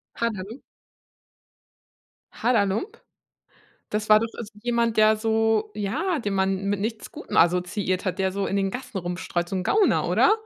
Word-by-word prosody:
Haderlump? 225 +1 -3 1.7
Haderlump? 220 - 0 0.9
Das 210 0 -2
war 215 0 +8
doch 230 - 0
is 220 -3 -7
jemand, 235 -1 0
der 215 0 +6
so, 220 0 +1
ja, 290 - -1
den 205 -6 -2
man 190 0 0
mit 200 0 0
nichts 220 +1 -4
Gutem - - -6
assoziiert 180 +2 +1
hat, 185 -1 -2
der 190 -1 0
so 200 0 -2
in 195 - -1
den 195 -1 +1
Gassen 250 -3 -6
rumstreut, 175 -1 -3
so 190 - -3
'n 185 - -2
Gauner, 420 -1 +2
oder? - - +4
210 Hz, 155 wpm, -25 LUFS, 190-225 Hz, 1.7 s, war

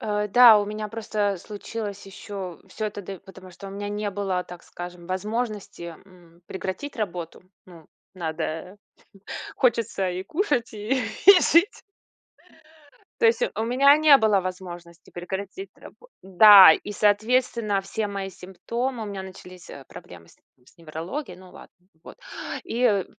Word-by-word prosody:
Э, 210 -1 -2
да, 230 0 +8
у 205 - 0
меня 215 +1 -5
просто 210 -2 -2
случилось 205 +1 -7
ещё 195 -2 -8
всё 215 - -6
это 205 -1 -7
д 195 0 -8
потому 190 -1 -14
что 190 +3 -12
у - - -8
меня 205 +1 -6
не 205 0 -3
было, 190 -2 -2
так 175 -1 -12
скажем, 175 0 -10
возможности, 205 -2 -4
м, 175 -2 -21
прекратить 190 +9 -6
работу. 180 -6 -5 0.2
Ну, 170 -4 -15 0.3
надо 165 +1 -5 0.8
хочется 230 -5 0
и 180 +1 -4
кушать, 290 - -1
и 225 +5 -1 0.4
жить 345 +8 +3 1.4
То 465 - +5
есть, 460 +2 +2
э, - - +1
у 220 - -2
меня 270 +4 +5
не 305 -2 +7
было 215 -5 +2
возможности 175 -2 -9
прекратить 195 - -7
рабо - - -16
Да, 190 -1 +9
и, 205 - -4
соответственно, 215 0 +1
все 210 +2 -3
мои 200 -1 -5
симптомы: 230 +7 -5
у - - -5
меня 200 -2 -6
начались, 185 -1 -12
э, 140 - -11
проблемы 85 -1 -13
с - - -21 0.2
не 125 - -31
с - - -23
неврологией, 170 - -7
ну 185 -1 -15
ладно, - - -15 0.3
вот. - - -13 0.5
И, 235 - -4
э, 205 -6 +3
200 Hz, 155 wpm, -24 LUFS, 180-220 Hz, 1.4 s, Да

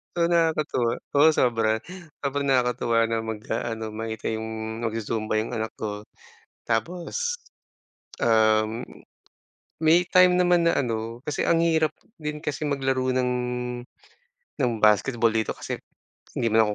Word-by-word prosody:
So 170 0 +2
nakakatuwa, 155 -8 +1 0.2
oo 145 +2 +6
sobra. 115 -2 +2 0.4
Sobrang 140 0 -1
nakakatuwa 125 -3 +2
na 115 0 0
mag-aano 110 0 -4
makita 110 +1 -4
yung 110 0 -4
magzu-zumba 110 -1 -2
yung 115 - -7
anak 110 -2 -3
ko. 105 -1 -5 0.5
Tapos, 180 - -2 0.8
um 110 0 +3 0.9
may 160 +2 +5
time 185 0 +6
naman 180 -1 +3
na 165 -4 +3
ano, 115 -1 -4
kasi 145 +2 -2
ang 165 0 +3
hirap 160 -2 +2 0.2
din 150 -1 -5
kasi 150 +1 -3
maglaro 135 -2 0
ng 125 -1 +1 1.3
ng 125 -2 +2
basketball 115 +2 +3
dito. 110 -1 -1
Kasi, - - -5 0.5
hindi 115 - 0
naman 110 -1 +3
120 Hz, 120 wpm, -25 LUFS, 110-150 Hz, 1.3 s, oo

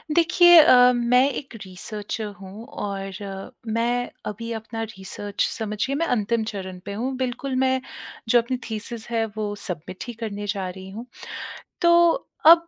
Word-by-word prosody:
देखिए 345 +1 +7
अ, 250 -5 +8
मैं 250 +3 +4
एक 265 -3 -6
रिसर्चर 210 +3 -5
हूँ 200 +4 -9
और 195 -6 -6
मैं 240 +2 0 0.2
अभी 230 +3 -5
अपना 225 +1 -5
रिसर्च 205 -1 -3
समझिए 220 +4 -2
मैं 330 +4 +1
अंतिम 225 0 +1
चरण 190 -3 -6
पे 200 - -4
हूँ। 250 +6 -2
बिल्कुल 260 +1 -2
मैं 260 0 +2 0.5
जो 240 - +6
अपनी 250 +2 -3
थीसिस 220 +1 -5
है 225 -1 +1
वो 210 -1 -2
सबमिट 180 0 -5
ही 240 - -5
करने 205 -2 -4
जा 195 -3 -2
रही 190 +1 -9
हूँ। 220 +5 -7 0.8
तो 340 -1 +5 0.2
अब 335 +1 +8
225 Hz, 150 wpm, -24 LUFS, 200-255 Hz, 0.8 s, अ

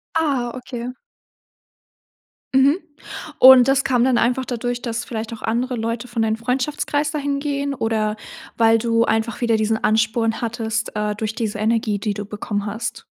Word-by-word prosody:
Ah, 275 -7 0
okay. 245 -1 -6 1.6
Mhm. 275 +6 +4 0.6
Und 260 -1 +9
das 270 0 +3
kam 245 -2 +2
dann 255 -2 +3
einfach 250 +3 +1
dadurch, 245 0 -3
dass 230 -1 -3
vielleicht 225 0 -5
auch 220 - -9
andere 245 +3 -1
Leute 230 +2 -3
von 235 -2 -2
deinen 220 0 0
Freundschaftskreis 285 +5 -1
da 305 - -3
hingehen 280 0 -2
oder, 220 -3 -1 0.4
weil 225 0 +5
du 230 0 +2
einfach 225 +1 -1
wieder 230 -2 +2
diesen 220 0 0
Ansporn 220 +1 +1
hattest, 225 -1 -3
äh, 210 0 -1
durch 215 +1 -3
diese 220 -3 -3
Energie, 220 -2 0
die 210 -1 -2
du 205 - -5
bekommen 205 0 -4
hast? 220 +3 -5
230 Hz, 160 wpm, -21 LUFS, 220-255 Hz, 1.6 s, Und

